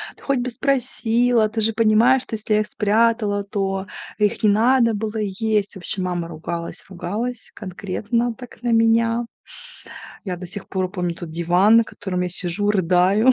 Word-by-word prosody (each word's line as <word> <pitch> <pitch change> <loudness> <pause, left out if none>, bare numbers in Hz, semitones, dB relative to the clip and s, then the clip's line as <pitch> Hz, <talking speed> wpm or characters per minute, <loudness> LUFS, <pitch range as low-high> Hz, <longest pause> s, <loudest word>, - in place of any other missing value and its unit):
ты - - -20
хоть 275 -2 +1
бы 255 +1 -2
спросила, 245 -3 +1
ты 225 - -3
же 225 +1 +2
понимаешь, 230 +4 +4
что - - -5
если 215 0 -2
я 210 - +4
их 210 - -4
спрятала, 210 -1 +1
то 195 -1 -3 0.3
их 210 -1 +1
не 215 - +5
надо 230 +2 +4
было 215 +1 -3
есть". 210 0 -1
В - - -10
общем, 185 +1 -2
мама 175 -2 -2
ругалась, 170 +1 -6
ругалась 215 +7 -4
конкретно 210 +5 -2
так 245 -1 -13
на 240 - 0
меня. 230 +1 +3 1.0
Я 180 -2 -3
до 180 - -7
сих 195 +3 -7
пор 185 -1 -2
помню 180 -3 -2
тот 170 0 -8
диван, 175 +6 +4
на 230 - +5
котором 185 -4 -4
я 180 - -2
сижу, 185 +3 0
рыдаю, 190 +5 +4
210 Hz, 175 wpm, -21 LUFS, 185-230 Hz, 1.0 s, не